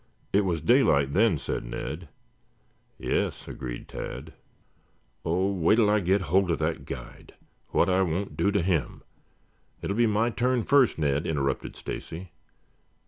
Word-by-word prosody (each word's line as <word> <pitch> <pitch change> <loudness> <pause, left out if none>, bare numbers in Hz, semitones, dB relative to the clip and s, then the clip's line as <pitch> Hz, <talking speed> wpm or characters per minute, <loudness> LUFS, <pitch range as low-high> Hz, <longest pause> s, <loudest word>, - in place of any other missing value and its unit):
It 100 - +5
was 85 -4 -1
daylight 75 - +4
then," 100 0 +3
said - - -3
Ned. 75 +7 -6 0.9
"Yes," - - -2
agreed - - -6
Tad. - - -7 0.9
"Oh, 95 +4 +1
wait 90 +1 +3
till 110 -3 +4
I 105 - +4
get 95 +1 +2
hold 95 +2 +2
of 85 - +1
that 80 +1 -2
guide! - - -9 0.3
What - - +3
I 95 0 +3
won't 95 +2 -1
do 100 - +2
to 100 -3 +1
him 85 -6 -1 0.4
" - - -39
"It - - -3
will 100 - 0
be 120 +1 +4
my 110 +3 +2
turn 120 +2 +1
first, 140 -2 +4
Ned," 75 -1 0
interrupted 70 -4 -1
Stacy. 85 +2 -7
95 Hz, 155 wpm, -27 LUFS, 80-105 Hz, 0.9 s, It